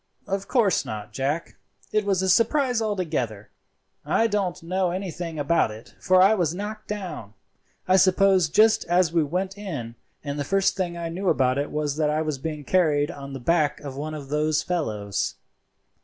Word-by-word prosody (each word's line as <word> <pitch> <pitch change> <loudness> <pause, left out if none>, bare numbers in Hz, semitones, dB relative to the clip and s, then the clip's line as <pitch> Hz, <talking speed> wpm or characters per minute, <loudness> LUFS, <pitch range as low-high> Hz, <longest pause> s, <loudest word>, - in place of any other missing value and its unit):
"Of 195 -1 -3
course 230 -7 +2
not, 105 -1 -7
Jack; 145 +5 -2 0.3
it 215 -1 +1
was 190 -2 +1
a - - 0
surprise 245 +4 +3
altogether. 155 - -2 0.5
I 225 - +2
don't 200 -6 -1
know 185 +2 0
anything 175 -3 -4
about 145 -2 +2
it, 110 +2 -11
for 185 0 +5
I 200 +3 +6
was 175 -5 0
knocked 215 +2 -6
down, 180 - -6 0.5
I 185 +1 +5
suppose, 190 -2 +4
just 215 +6 +4
as 175 -1 +2
we 170 - +4
went 185 +6 -3
in, 145 - -5 0.3
and 145 0 -4
the - - 0
first 195 +6 +1
thing 175 -3 -2
I 170 -1 -4
knew 185 +3 -1
about 130 0 +2
it 145 - -2
was 150 -1 -2
that 155 -1 +2
I 155 +1 0
was 155 -3 -3
being 150 0 -5
carried 150 -3 +2
on 140 -1 -9
the 135 - -5
back 150 +3 +1
of 140 -2 -7
one 155 +3 -4
of 140 -3 -8
those 150 +1 +1
fellows. 105 - -2
170 Hz, 185 wpm, -25 LUFS, 145-190 Hz, 0.5 s, I